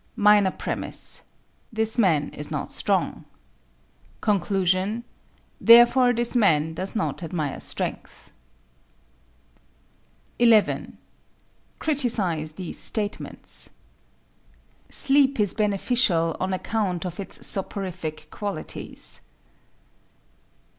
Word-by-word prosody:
MINOR 205 -2 +5
PREMISE: - - -2 0.5
This 220 +1 0
man 160 -9 +2
is 150 - -6
not - - -4
strong. - - -1 1.0
CONCLUSION: 195 +1 0 0.6
Therefore 240 +2 +7
this 240 +1 0
man 160 -8 +3
does 190 +6 -5
not 215 - -2
admire 155 -4 -3
strength. - - -5 2.1
11. 230 -3 +3 0.8
Criticise 210 - 0
these 180 +1 -4
statements: 210 -2 0 1.2
Sleep 275 -2 +3
is 205 -2 +3
beneficial 200 -5 +1
on 185 +1 -2
account 185 -2 -2
of 175 0 -6
its 195 - -3
soporific 185 -5 -3
qualities. 205 -1 -6
200 Hz, 80 wpm, -24 LUFS, 175-230 Hz, 2.1 s, Therefore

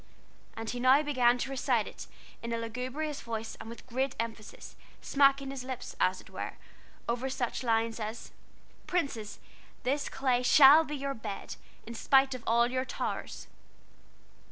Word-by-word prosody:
And 225 0 -6
he 245 - -3
now 260 +4 +5
began 250 -4 +3
to 265 +2 -3
recite 255 -5 +1
it - - -9 0.3
in 235 - -5
a 230 - 0
lugubrious 255 +6 -4
voice 225 -1 -5
and 225 - -9
with 235 - -10
great 260 +2 -1
emphasis, 225 -2 -6 0.2
smacking 275 -1 +3
his 270 -2 -6
lips, 260 -1 -6
as - - +2
it - - -15
were, - - -5 0.5
over 245 +3 -1
such 250 -2 -2
lines 230 -1 +1
as 220 +1 -6 0.6
"Princes, 255 - -2 0.5
this 280 +3 0
clay 255 -2 +1
shall 285 +4 +8
be 300 -1 -5
your 275 0 -3
bed, 215 -5 -6 0.3
In 235 - -7
spite 270 +3 +3
of 255 -2 -7
all 235 +2 +3
your 255 0 0
towers." 260 - -4
250 Hz, 155 wpm, -30 LUFS, 230-275 Hz, 0.6 s, shall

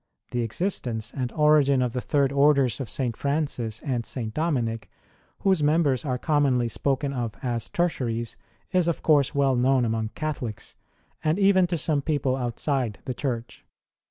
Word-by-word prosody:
The 120 - 0
existence 115 - -2
and 130 -3 -2
origin 150 -3 +4
of 120 -2 -2
the 125 - -2
Third 140 -1 +1
Orders 140 -2 +3
of 130 -6 -4
St. 120 -2 -2
Francis 140 -6 -2
and 125 -5 -2
St. 115 -3 -5
Dominic, 125 -9 -1 0.5
whose 190 -5 +3
members 150 -3 +2
arc 125 -4 -3
commonly 140 -6 +2
spoken 140 +3 -1
of 120 -4 -3
as 120 -3 -2
Tertiaries, 120 -9 -1 0.4
is 180 -2 +2
of 170 - -1
course 145 -3 +3
well 135 -2 +3
known 130 0 +3
among 110 -1 -1
Catholics, 140 -9 -4 0.5
and 155 +2 +2
even 195 -2 +4
to 170 -1 -1
some 150 -1 0
people 140 -3 0
outside 125 -2 -2
the 130 - -2
Church. 120 -3 -4
135 Hz, 155 wpm, -25 LUFS, 120-150 Hz, 0.5 s, origin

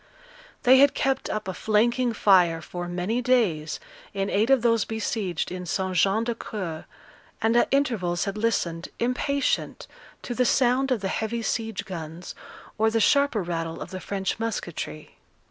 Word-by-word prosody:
They 260 +1 +7
had 280 0 +5
kept 270 0 0
up 215 -1 -3
a 190 - -2
flanking 235 +5 +1
fire 180 -6 +4
for 175 +2 -6
many 180 +7 -1
days 215 -12 +1 0.4
in 195 0 -1
aid 215 +5 +2
of 270 -3 +4
those 230 -2 +3
besieged 215 -6 -3
in 180 0 -6
St 185 +1 -1
Jean 195 +5 +3
d'Acre; 210 -8 -5 0.5
and 225 +1 +2
at 240 - +4
intervals 225 -12 0
had 200 -1 -3
listened, 180 -7 -1
impatient, 270 +3 -1 0.4
to 245 - -4
the 250 - +2
sound 255 +2 +2
of 250 -6 0
the 195 - -1
heavy 225 +3 -2
siege 225 -2 -2
guns, 170 -1 -7 0.5
or 220 +1 +4
the 225 0 +1
sharper 280 -2 +3
rattle 165 -1 -3
of - - -7
the 185 - -5
French 195 +1 -3
musketry. 175 -8 -5
215 Hz, 160 wpm, -25 LUFS, 180-240 Hz, 0.5 s, They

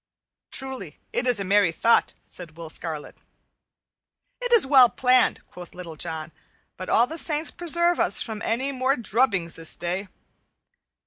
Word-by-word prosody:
"Truly, 260 - -3 0.2
it 255 - -1
is 245 -4 +4
a - - -2
merry 200 -2 +3
thought," 230 +8 +2
said 165 -3 -9
Will 165 -2 -8
Scarlet. 160 -4 -6 1.2
"It - - -3
is 470 - +6
well 265 -3 +7
planned," 255 +1 +2
quoth 175 -1 -12
Little 175 -3 -9
John, 160 0 -5 0.4
"but 185 - -8
all 235 - +4
the 320 +6 -3
saints 305 0 +1
preserve 345 0 0
us - - +2
from 220 -2 -4
any 260 +6 -1
more 260 +1 0
drubbings 210 - 0
this 165 -1 -1
day! 180 +3 -3
220 Hz, 150 wpm, -24 LUFS, 170-265 Hz, 1.2 s, well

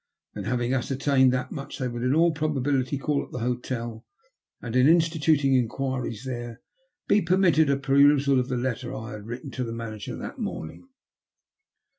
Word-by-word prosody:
Then, - - -6
having 120 +1 0
ascertained 135 0 +2
that 125 0 -2
much, 140 -1 -6
they 130 - -2
would 120 -1 -5
in 125 +3 +1
all 170 +1 +4
probability 145 -3 0
call 145 +1 -1
at - - -13
the - - -7
hotel, 120 -2 -3 0.6
and 120 -1 -6
in 130 +2 +5
instituting 160 -4 +3
enquiries 125 -1 -1
there, 120 -2 -5 0.5
be 210 - +4
permitted 170 -3 +3
a 140 - +3
perusal 140 0 +4
of 125 - -1
the 125 - -1
letter 125 +1 -3
I 110 +2 -6
bad 105 +1 -11
written 125 +3 -6
to 130 - -3
the 115 - -4
manager 110 -3 -6
that - - -7
morning. 80 - -6
130 Hz, 170 wpm, -26 LUFS, 120-145 Hz, 0.6 s, in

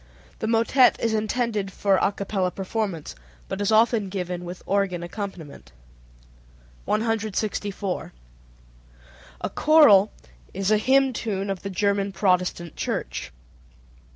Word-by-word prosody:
The - - -2
motet 230 +3 +4
is 225 -1 0
intended 215 -2 -1
for 195 0 +2
a - - +2
capella 195 -2 -2
performance, 190 - -4 0.3
but 195 - -4
is 205 - +1
often 220 -2 +3
given 180 -2 -4
with 175 +1 -8
organ 195 -3 0
accompaniment. 170 - -8 1.1
164. 215 -3 -2 1.3
A - - -2
choral 225 -11 +6 0.4
is 195 +2 0
a 215 - +4
hymn 265 +3 +3
tune 200 -4 -3
of 195 - -5
the 200 - -5
German 200 +1 0
Protestant 180 -4 0
Church. - - -4
200 Hz, 115 wpm, -24 LUFS, 185-220 Hz, 1.3 s, choral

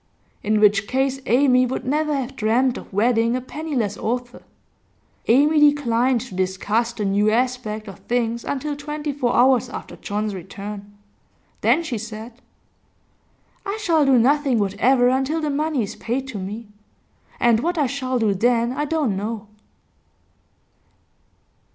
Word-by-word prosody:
in 215 0 +1
which 205 -1 +4
case 265 +1 0
Amy 255 0 +4
would 255 +1 -3
never 300 +3 0
have 270 -1 -4
dreamt 240 +3 +1
of - - -9
wedding 230 +3 +2
a - - 0
penniless 255 -7 -3
author. 245 +2 -3 0.9
Amy 295 +6 +4
declined 260 -4 +3
to 245 -6 -9
discuss 190 +5 0
the 215 -3 -4
new 200 +2 +2
aspect 230 -2 -1
of 195 - -10
things 235 -1 -1
until 290 +1 -3
twenty 295 +1 -4
four 255 -3 0
hours 255 0 +4
after - - -8
John's 210 0 -3
return; 200 +2 -8 0.6
then 340 - +3
she 250 -9 -3
said: 225 +2 -9 1.2
'I 400 +2 -3
shall 330 -7 +2
do 270 -2 +4
nothing 275 +1 +3
whatever 225 +5 +2
until 265 +5 +1
the 305 -2 -1
money 295 -3 0
is 200 - -6
paid 260 +4 -3
to 220 -6 -5
me. 205 +4 -6 0.7
And 235 -2 +4
what 345 +7 -1
I 295 - +2
shall 260 -1 -2
do 220 -4 +2
then 235 +4 +2
I 295 +3 -2
don't 295 -9 0
know. 210 +1 -5
245 Hz, 145 wpm, -22 LUFS, 215-275 Hz, 1.2 s, which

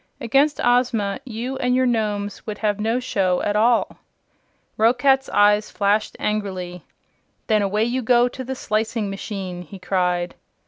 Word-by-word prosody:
Against 275 +6 +2
Ozma 245 -4 +1
you 250 +2 -4
and 250 0 +1
your 260 0 +3
Nomes 210 -4 -2
would 210 -1 -4
have 210 -1 -1
no 225 +3 0
show 190 -8 0
at 205 - 0
all." 230 +3 +2 0.8
Roquat's 265 +4 +3
eyes 210 +1 +3
flashed 205 +1 0
angrily. 185 -4 -3 0.6
"Then 215 -2 +2
away 205 +2 +1
you 245 +3 -1
go 245 +1 +4
to 260 +1 -7
the 265 +1 -4
slicing 215 -2 -2
machine!" 195 -3 -5
he 180 +3 -10
cried. 180 -1 -1
215 Hz, 145 wpm, -22 LUFS, 200-245 Hz, 0.8 s, go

